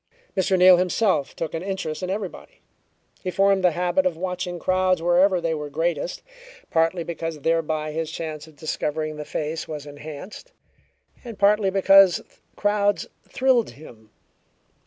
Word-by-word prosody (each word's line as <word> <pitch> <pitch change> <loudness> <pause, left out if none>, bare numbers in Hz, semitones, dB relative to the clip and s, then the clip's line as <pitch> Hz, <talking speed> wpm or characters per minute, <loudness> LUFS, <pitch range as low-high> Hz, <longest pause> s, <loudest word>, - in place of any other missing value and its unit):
Mr. 190 0 +2
Neal 180 0 +8
himself 180 -4 +1
took 165 - -4
an 165 - -3
interest 185 -5 -4
in 185 - -3
everybody. 205 - -6 0.6
He 185 - -2
formed 195 0 +2
the 180 -2 +4
habit 180 +1 +2
of 170 -3 -3
watching 180 0 -3
crowds 185 +1 +1
wherever 175 +2 +3
they 165 -1 -1
were 150 -1 -5
greatest, 165 +2 -2 0.5
partly 165 +2 +1
because 165 -2 -5
thereby 155 -1 0
his 160 0 -3
chance 155 -2 -6
of 155 - -17
discovering 155 0 -3
the 150 - -6
face 155 +2 -4
was 150 -2 -6
enhanced, 150 - -10 0.7
and 230 -4 -8
partly 205 0 +3
because 195 -1 +6 0.4
crowds 205 0 +1 0.2
thrilled 255 -3 +2
him. 115 -7 -14
175 Hz, 145 wpm, -23 LUFS, 155-190 Hz, 0.7 s, Neal